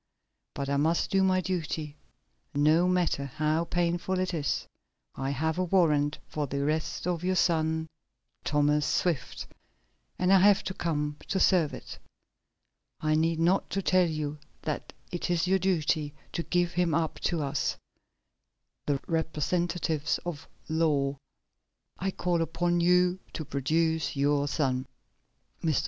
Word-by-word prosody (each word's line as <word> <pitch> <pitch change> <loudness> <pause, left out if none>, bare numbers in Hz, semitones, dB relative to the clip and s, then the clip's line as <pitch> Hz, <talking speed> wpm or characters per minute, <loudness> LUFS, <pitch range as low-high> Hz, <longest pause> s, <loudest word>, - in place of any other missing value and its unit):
But 140 - -3
I 140 0 +1
must 160 +4 +1
do 195 - +3
my 185 -1 +3
duty, 160 -5 -3 0.6
no 155 +5 +4
matter 180 -6 +1
how 155 +4 0
painful 175 +2 0
it 185 0 -1
is. 145 -4 -1 0.5
I 135 0 -3
have 160 +5 -1
a - - +2
warrant 150 -5 +2
for 150 -2 -3
the 140 +1 -2
arrest 155 +2 -1
of 175 -1 -1
your 185 +1 +1
son, 160 -2 +2 0.6
Thomas 150 0 +2
Swift, 155 -4 -1 0.7
and 185 +1 +3
I 195 - +7
have 200 +1 +5 0.2
come 150 -3 -1
to 190 - 0
serve 175 -6 +3
it. - - -10 1.0
I 155 0 +1
need 160 +1 +2
not 175 +4 +2
tell 185 -2 +2
you 150 -1 -3 0.2
that 150 - -3 0.2
it 175 0 -3
is 175 0 +1
your 190 +1 +3
duty 155 -5 0 0.2
to 170 - -1
give 175 0 +1
him 175 -3 +1
up 160 -1 -1
to 170 -3 0
us 140 - -1 1.1
the 140 -2 +1
representatives 160 -1 0
of 160 -5 -5 0.2
the 155 - -5
law. 140 -3 +2 0.8
I 195 - 0
call 175 -2 0
upon 175 +1 0
you 180 +1 +3
to 155 - -4
produce 160 +4 0
your 145 +1 +2
son." 130 -3 0 0.8
Mr. 155 -4 +2
160 Hz, 140 wpm, -28 LUFS, 150-175 Hz, 1.1 s, I